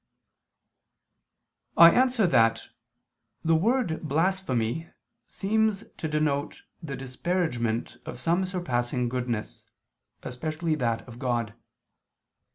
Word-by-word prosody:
I 170 0 +10
answer 250 -2 +3
that, 115 -8 +3 0.8
The 165 - +4
word 200 0 +1
blasphemy 160 -4 0 0.4
seems 215 0 0
to 160 - -3
denote 150 -2 -1 0.2
the 145 -5 -5
disparagement 130 -4 -2
of - - -6
some 170 +7 +1
surpassing 125 -10 -1
goodness, 120 -3 -3 0.6
especially 155 +5 -3
that 115 -3 -1
of 120 0 -11
God. 120 -4 -1
155 Hz, 90 wpm, -27 LUFS, 120-180 Hz, 0.8 s, I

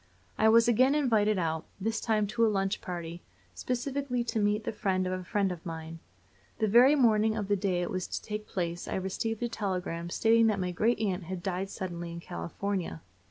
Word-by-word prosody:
I 220 - +4
was 230 +1 +6
again 255 +4 +4
invited 220 -8 +2
out; 160 -2 -2
this 220 +3 -1
time 215 -2 +1
to 215 +3 0
a 225 - +5
lunch 195 -1 -1
party, 170 -2 -6 0.3
specially 250 - -2
to 230 -1 -2
meet 210 +1 +1
the - - -2
friend 190 -3 0
of 185 - -1
a 185 0 -4
friend 195 0 0
of 175 -2 -7
mine. 165 -1 -7 0.6
The 220 - +1
very 245 +7 +6
morning 220 -5 +3
of 205 -3 -2
the 205 - +2
day 185 -3 0
it 175 - -4
was 185 -1 -2
to - - -3
take 210 0 -6
place 175 -2 -3
I - - -3
received 210 +5 -2
a - - +1
telegram 180 -6 -3
stating 225 +4 +4
that 210 -2 +1
my 180 -1 -1
great 220 +7 +1
aunt 190 -4 -1
had 180 0 -5
died 190 0 -2
suddenly 175 -3 -5
in 170 - -6
California. 170 - -4
200 Hz, 205 wpm, -29 LUFS, 180-225 Hz, 0.6 s, was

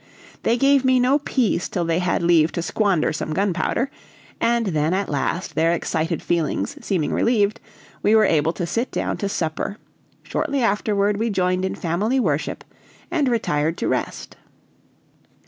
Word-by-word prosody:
They 235 - +2
gave 275 +1 +4
me 260 -1 +4
no 260 +4 +3
peace 250 -10 0
till 175 -2 -1
they 165 +1 +1
had 180 -1 0
leave 170 -2 +4
to 170 - -2
squander 190 -4 +1
some 155 0 -3
gunpowder, 200 - 0 0.5
and 235 0 +2
then 160 -2 +1
at 195 0 -1
last 150 +5 -2
their 165 +1 +2
excited 165 0 -2
feelings 160 - -1
seeming 175 -6 -1
relieved, 215 -2 +2 0.4
we 210 +2 +4
were 215 -1 +6
able 160 -2 +2
to 175 - -3
sit 230 +9 -1
down - - -2
to 200 - -2
supper; 170 +3 -3 0.5
shortly 280 -4 -1
afterward 205 -1 +1
we 225 +2 0
joined 185 -2 0
in 190 - -2
family 205 +10 0
worship 155 - -1 0.5
and 310 -6 +1
retired 160 -8 0
to - - -2
rest. - - -3
195 Hz, 160 wpm, -22 LUFS, 165-230 Hz, 0.5 s, were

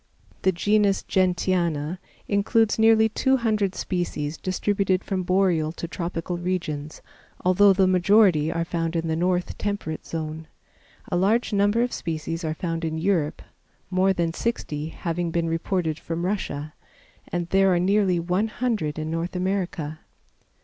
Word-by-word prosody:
The 190 - +3
genus 205 +2 +2
Gentiana 175 -3 0 0.3
includes 220 +2 +2
nearly 220 0 +6
two 265 +4 +2
hundred 215 -5 0
species 165 -4 -2
distributed 190 +1 0
from 190 -2 -2
boreal 180 -4 +2
to 170 - -5
tropical 175 0 -4
regions, 155 -4 -3 0.4
although 195 +2 +6
the 190 0 +4
majority 185 -3 +4
are 165 0 -1
found 165 -1 -2
in 165 0 -1
the 160 - 0
north 180 +1 -1
temperate 200 -6 -3
zone. 160 -1 -5 0.6
A - - +1
large 210 +6 +2
number 205 +3 +3
of 245 - -2
species 165 0 -4
are 155 -1 -2
found 165 -1 -3
in 160 -1 -2
Europe, 165 -3 0 0.5
more 185 +1 +3
than 170 -3 0
sixty 155 -9 -3
having 170 0 -3
been 165 0 0
reported 165 -1 -1
from 165 +1 -3
Russia, 155 -6 -3 0.6
and 175 0 -2
there 195 +1 +4
are 175 - +3
nearly 190 -1 +2
one 180 +5 0
hundred 215 -10 -2
in 155 0 -3
North 165 +2 -3
America. 180 -5 -2
180 Hz, 145 wpm, -24 LUFS, 165-195 Hz, 0.6 s, nearly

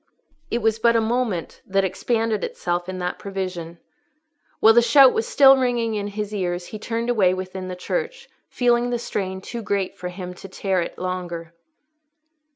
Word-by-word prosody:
It 235 -1 -2
was 225 0 +2
but 235 +1 +4
a - - +5
moment 225 -6 -2
that 195 0 +1
expanded 220 +3 -1
itself 175 +1 -2
in 185 - -4
that 180 0 -3
prevision. 185 -4 -5 0.8
While 225 - +7
the 240 - +6
shout 265 +2 +7
was 220 - -1
still 270 -1 +7
ringing 240 -3 0
in 205 -1 -2
his 210 0 -5
ears 175 -3 -2
he 215 - -8
turned 230 +2 -2
away 190 -6 +3
within 185 0 -6
the 185 - -5
church, 485 - -4 0.2
feeling 240 -1 +2
the 240 - 0
strain 190 -5 -4
too 235 +4 -6
great 200 -3 -2
for 180 - -6
him 180 0 -7
to 190 +2 -11
bear 190 -1 -1
it 170 - -5
longer. 175 -2 -5
200 Hz, 175 wpm, -23 LUFS, 185-235 Hz, 0.8 s, While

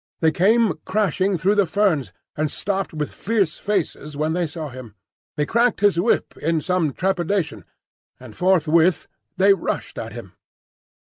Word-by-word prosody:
They 160 -1 +3
came 215 +4 +3
crashing 190 -1 0
through 185 +6 +2
the 200 -3 +2
ferns, 165 -5 +1 0.2
and 155 0 -1
stopped 195 +3 -2
with 150 -2 -4
fierce 200 -6 -1
faces 160 -7 -2
when 155 +1 0
they 175 -1 0
saw 155 0 -6
him. 125 -5 -11 0.4
He 150 - +1
cracked 235 +4 +1
his 205 -4 +3
whip 220 +7 +1
in 165 +1 0
some 180 -3 0
trepidation, 175 - -1 0.5
and - - -12
forthwith 170 -1 +3 0.3
they 195 +2 +6
rushed 195 - -4
at - - -6
him. - - -10
180 Hz, 150 wpm, -22 LUFS, 155-200 Hz, 0.5 s, they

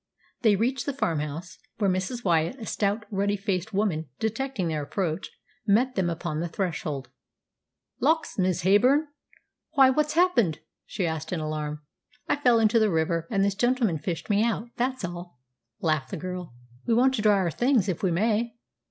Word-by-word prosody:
They 220 -4 +5
reached 245 +7 -1
the 285 - 0
farmhouse, 160 - -3 0.2
where 210 -3 +1
Mrs. 195 +6 -1
Wyatt, 170 +8 +1
a 225 - -6
stout, 210 +1 -1
ruddy 200 +1 0
faced 195 +1 -2
woman, 190 -7 -1
detecting 225 -3 -2
their 155 -2 -1
approach, 165 +3 -2 0.4
met 240 +6 +3
them 185 -5 0
upon 165 -2 -3
the 170 - -1
threshold. 155 -6 -3 0.9
"Lawks, 320 +1 +1
Miss 185 -1 +1
Heyburn! 255 - +4 0.6
why, 265 -1 +6
what's 300 +2 +1
happened?" 305 - +3 0.3
she 185 - -2
asked 160 -1 -3
in 180 - -1
alarm. 150 -1 -4 0.4
"I - - +2
fell 245 -5 +4
into 225 +1 +4
the 215 -1 +3
river, 165 -1 0
and 195 -2 +2
this 200 - +1
gentleman 230 - +1
fished 165 +2 -4
me 205 0 +3
out. 230 0 -1
That's 255 -3 -1
all," 175 -5 -8 0.4
laughed 155 -5 0
the - - -4
girl. 180 -5 -6 0.3
"We 230 - +3
want 260 +3 +4
to 220 - -1
dry 210 -1 +5
our 180 -3 +1
things, 240 - +2
if 185 -4 -2
we 190 - +2
may." 220 +6 +1
195 Hz, 175 wpm, -26 LUFS, 165-235 Hz, 0.9 s, why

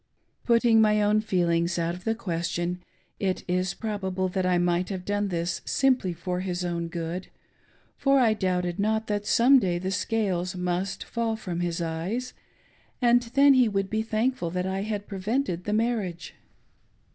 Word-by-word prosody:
Putting 230 -1 +4
my 210 -1 +4
own 210 +1 +3
feelings 175 -4 +1
out 170 0 0
of 180 +1 -10
the 225 0 +1
question, 175 -3 -3 0.4
it 190 -2 -1
is 180 +1 0
proba 205 -4 -3
ble 185 0 -1
that 185 0 -1
I 180 -1 +3
might 175 +1 +1
have 185 -2 -5
done 205 0 0
this 175 -1 -2
simply 255 -9 +2
for 180 +1 -3
his 180 -1 -3
own 170 -1 -2
good; 170 +1 -4 0.7
for 275 0 +3
I 230 -4 +4
doubted 180 -3 -1
not 220 +2 +1
that 205 -1 -2
some 260 +3 +6
day 180 -6 0
the 185 +2 -3
scales 190 -3 -1
must 180 +2 -2
fall 230 -1 -2
from 180 -6 -5
his 175 -1 -1
eyes, 180 +10 -3 0.7
and 245 -1 +4
then 280 0 +7
he 250 -3 +4
would 195 -1 -2
be 220 0 +1
thankful 220 -3 -1
that 180 +1 -2
I 190 +1 -2
had 205 -1 -3
prevented 195 -1 -2
the 210 - -1
marriage. 215 -6 -1
190 Hz, 170 wpm, -26 LUFS, 175-220 Hz, 0.7 s, then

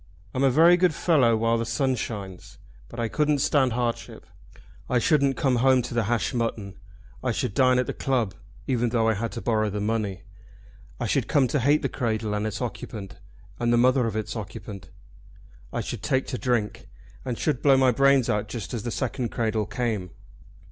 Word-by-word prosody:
I'm 130 - -1
a 135 - +5
very 165 +6 +6
good 180 -3 +2
fellow 130 -10 +3
while 115 +1 +1
the - - 0
sun 135 0 0
shines, 100 -6 -6 0.3
but 120 - -9
I 115 - 0
couldn't 150 +4 +1
stand 130 -2 +2
hardship. 120 -1 -3 0.6
I 125 - +2
shouldn't 140 +1 +2
come 130 -3 +2
home 130 +1 +4
to - - -6
the 115 -2 0
hashed 120 +4 0
mutton. 110 -5 -3 0.4
I 125 - +1
should 105 - -2
dine 130 +1 +4
at 125 - +1
the - - -4
club, 120 -7 -1 0.3
even 120 -3 0
though 115 -1 +1
I 110 - +3
had 115 +2 -3
to 115 - -5
borrow 110 -2 +1
the 105 +1 -4
money. 105 -3 -2 0.8
I - - -2
should - - 0
come 135 -3 +3
to 145 - +1
hate 145 +5 +2
the - - +2
cradle 110 -4 -2
and 105 +1 -1
its 105 +2 -4
occupant, 105 -4 -7 0.4
and 120 0 +1
the 120 - +4
mother 125 0 +3
of 110 - -4
its 110 +1 -3
occupant. 100 -2 -8 0.8
I - - -2
should - - -5
take 130 0 0
to 125 - -3
drink, 120 -5 -1 0.4
and 125 -3 -3
should 150 -6 -1
blow 135 -2 +5
my 130 -1 +4
brains 140 0 +4
out 105 0 0
just 105 -6 -6
as 115 - -2
the 120 - -4
second 125 0 -2
cradle 110 -3 -1
came. 105 -4 -2
120 Hz, 200 wpm, -25 LUFS, 110-130 Hz, 0.8 s, very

